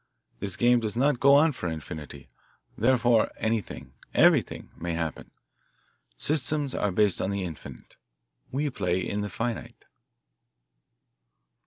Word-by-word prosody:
This 100 -2 -2
game 120 0 +4
does 110 -1 -3
not 135 0 +2
go 140 0 +6
on 155 +3 +5
for 90 - -4
infinity 75 -3 -8 0.5
therefore 120 -3 +3
anything, 110 - -3 0.2
everything, - - +3
may 85 0 -4
happen. 80 -2 -4 0.9
Systems 145 - +1
are 105 - 0
based 105 0 +2
on 95 - -1
the 100 -1 -2
infinite; 85 -4 -9 0.5
we 145 +2 -1
play 90 -6 -1
in 100 +3 -3
the 105 - -3
finite." 115 +1 -5
110 Hz, 125 wpm, -27 LUFS, 90-130 Hz, 0.9 s, go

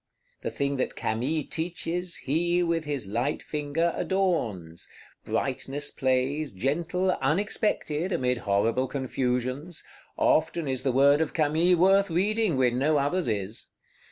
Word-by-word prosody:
The - - -2
thing 140 0 -1
that 130 - -2
Camille 130 +8 -1
teaches 175 +1 -2
he, 175 +5 +1
with 165 -2 0
his 145 -6 -1
light 120 +8 -1
finger, 150 +3 -1
adorns: 115 - -1 0.4
brightness 145 +2 -2
plays, 135 +3 0
gentle, 170 - 0
unexpected, 175 +1 0
amid 125 -6 0
horrible 115 +6 +1
confusions; 130 +4 -2 0.3
often 160 0 +2
is 130 -2 -1
the 130 0 +1
word 140 +4 +5
of 160 - -1
Camille 160 +3 +3
worth 195 +3 +4
reading, 200 0 +1
when 125 -1 +2
no 150 +3 +3
other's 145 +4 0
is. 105 -1 -3
145 Hz, 125 wpm, -27 LUFS, 130-170 Hz, 0.4 s, word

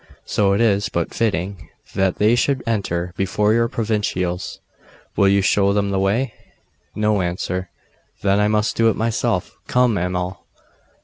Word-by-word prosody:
So 100 -2 +2
it 100 - +1
is 100 -3 +2
but 85 -1 -2
fitting 100 -3 -2 0.2
that 95 -1 +1
they 105 +2 +3
should 130 +2 +1
enter 90 -6 -2
before 105 +3 +1
your 115 0 +3
provincials. 105 -6 -2 0.6
Will 100 - +4
you 100 0 +3
show 100 0 +3
them 100 -1 0
the 95 - 0
way?' 110 +5 0 0.6
No 105 -2 +1
answer. 90 +1 -3 0.5
'Then 100 0 +3
I 105 - +3
must 105 +1 +1
do 115 0 +4
it - - 0
myself. 115 0 -1
Come, 125 -5 +2
Amal! 90 +1 -3
100 Hz, 150 wpm, -21 LUFS, 95-110 Hz, 0.6 s, Will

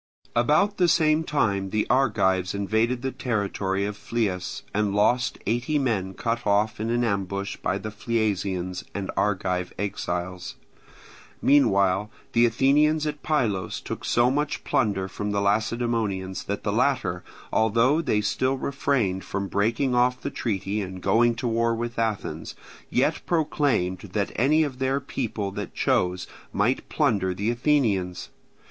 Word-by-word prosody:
About 150 - +3
the 180 - +4
same 155 -1 +3
time 100 -11 0
the 105 +2 0
Argives 95 -8 +2
invaded 110 +5 0
the 135 - -1
territory 100 -6 -1
of 105 0 -3
Phlius 105 -4 -2
and 105 -1 0
lost 120 +3 +2
eighty 120 +8 0
men 100 -9 -1
cut 115 -1 -2
off 105 +2 +2
in 110 +1 -2
an 120 +1 +1
ambush 100 -2 -2
by 95 - -1
the 110 +1 -6
Phliasians 100 -5 -1
and 100 -1 -3
Argive 90 -3 0
exiles. 90 -2 -3 0.8
Meanwhile 100 -7 +3 0.2
the 120 +1 +5
Athenians 150 +6 +3
at 150 -1 -3
Pylos 115 - 0
took - - -6
so 120 +1 +3
much 145 +1 -1
plunder 100 -6 0
from 105 +2 -4
the 100 0 0
Lacedaemonians 105 -2 -1
that 100 0 -3
the 105 - -1
latter, 110 -8 +1 0.3
although 115 +8 +3
they 115 -9 +1
still 130 +5 0
refrained 130 -9 0
from 100 0 -3
breaking 115 +7 +1
off 125 +1 +2
the - - -4
treaty 100 -2 -2
and 95 -1 -6
going 115 +4 +3
to 120 - -3
war 115 0 +1
with 120 0 -4
Athens, 110 -3 -2 0.3
yet - - +1
proclaimed 140 - +1
that 100 +1 -3
any 150 +7 +3
of 135 -4 -4
their 135 +1 +1
people 115 -7 -3
that - - -6
chose 90 0 +1 0.3
might 115 +6 0
plunder 100 - +1
the 105 +5 0
Athenians. 115 -9 0
110 Hz, 145 wpm, -25 LUFS, 100-125 Hz, 0.8 s, the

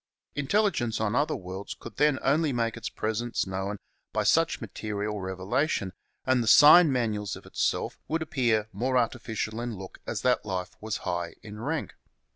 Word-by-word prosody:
Intelligence 145 - +1
on 110 -1 0
other 145 +3 +2
worlds 95 +2 -6
could 115 - -10
then 150 -2 +4
only 150 +2 +2
make 115 -2 0
its 115 - -5
presence 115 +2 -2
known 95 +2 -3 0.3
by - - 0
such - - +3
material 105 0 -4
revela 95 +10 -1
tion, 95 -9 -2 0.3
and 130 -1 +3
the 115 - -2
sign 150 +6 +9
manuals 110 -5 -1
of - - -12
itself - - -1
would 160 +1 -1
appear 120 -8 +1
more 130 +6 0
artificial 115 -2 -1
in 120 -3 -4
look 95 0 -10
as - - -3
that 125 -1 +3
life 90 -2 -4
was 110 -1 -2
high 85 -2 -2
in 105 0 -9
rank. 145 +6 -3
115 Hz, 170 wpm, -28 LUFS, 100-130 Hz, 0.3 s, sign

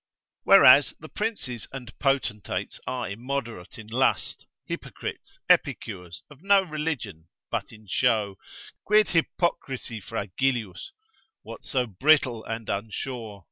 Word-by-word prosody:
Whereas - - +8
the - - -11
princes 200 - -3
and 130 -2 -8
potentates 135 -7 -1
are 125 -1 -2
immoderate 115 -2 -5
in 110 - -9
lust, 120 +5 0 0.2
hypocrites, - - -7
epicures, 90 -1 0
of 145 -1 -16
no 200 0 +5
religion, 150 - -4 0.2
but - - -2
in 110 -1 -15
show: 105 -2 +1 0.5
Quid 210 0 +4
hypocrisi 135 - -1
fragilius? 115 - -2 0.5
what - - -9
so 130 -3 0
brittle 125 +1 +3
and 115 0 -5
unsure? 110 +1 -4
120 Hz, 110 wpm, -26 LUFS, 105-140 Hz, 0.5 s, Whereas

